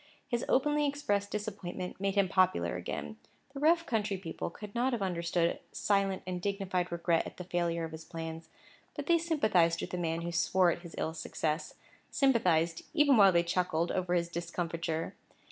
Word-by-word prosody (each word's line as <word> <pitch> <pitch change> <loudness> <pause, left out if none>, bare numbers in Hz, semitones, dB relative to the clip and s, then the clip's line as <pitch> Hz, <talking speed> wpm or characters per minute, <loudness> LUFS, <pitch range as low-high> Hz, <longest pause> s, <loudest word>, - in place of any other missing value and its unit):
His 240 -2 -1
openly 295 +2 +3
expressed 205 -9 -1
disappointment 200 -4 -5
made 195 0 0
him 200 -2 +4
popular 180 - +2
again. 90 - -5 0.4
The 275 - -6
rough 335 +3 +4
country 210 -3 -1
people 170 -3 -5
could 205 +4 -10
not 245 +2 +1
have 235 - -1
understood 170 -2 0
silent 195 -2 +1
and 180 -1 -4
dignified 190 -2 -1
regret 170 -1 +1
at - - -11
the 180 - -5
failure 170 -1 -1
of 165 - -4
his 160 0 -8
plans, 165 0 -7 0.5
but - - -4
they 340 -1 +4
sympathized 215 - +2
with - - -5
a - - -1
man 165 -1 -1
who 170 +1 -3
swore 175 +1 +3
at - - -3
his 170 -2 -10
ill 160 - -1
success—sympathized, 165 - 0
even 295 -4 +5
while 200 -4 +7
they 170 -1 +3
chuckled 170 -1 0
over 180 -1 0
his 170 -1 +1
discomfiture. 170 -1 -3
180 Hz, 175 wpm, -31 LUFS, 170-210 Hz, 0.5 s, while